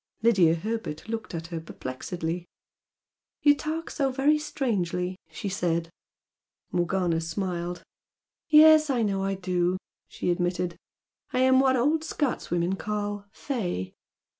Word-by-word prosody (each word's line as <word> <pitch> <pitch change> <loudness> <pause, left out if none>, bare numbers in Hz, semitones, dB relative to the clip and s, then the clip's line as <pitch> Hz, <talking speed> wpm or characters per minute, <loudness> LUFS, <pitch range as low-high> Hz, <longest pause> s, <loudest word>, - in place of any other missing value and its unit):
Lydia 190 -8 +5
Herbert 215 -2 -4
looked 225 -5 -4
at 165 0 -4
her 165 - -2
perplexedly. 165 +4 -5 1.0
"You 290 -1 +7
talk 315 +3 -4
so 275 -2 0
very 285 +4 +3
strangely!" 185 - -1
she 160 +5 -6
said. 170 -4 -1 0.8
Morgana 175 -1 +1
smiled. 175 0 -3 0.7
"Yes, 310 0 +8
I 245 -4 +2
know 195 -2 0
I 195 0 0
do!" 180 -1 0 0.3
she 180 - -2
admitted 175 0 -1 0.6
"I 255 - +2
am 260 0 +5
what 265 -1 +4
old 300 +6 +2
Scotswomen 190 - -1
call 205 -1 -3
'fey'! 180 - -3
195 Hz, 120 wpm, -27 LUFS, 175-260 Hz, 1.0 s, Yes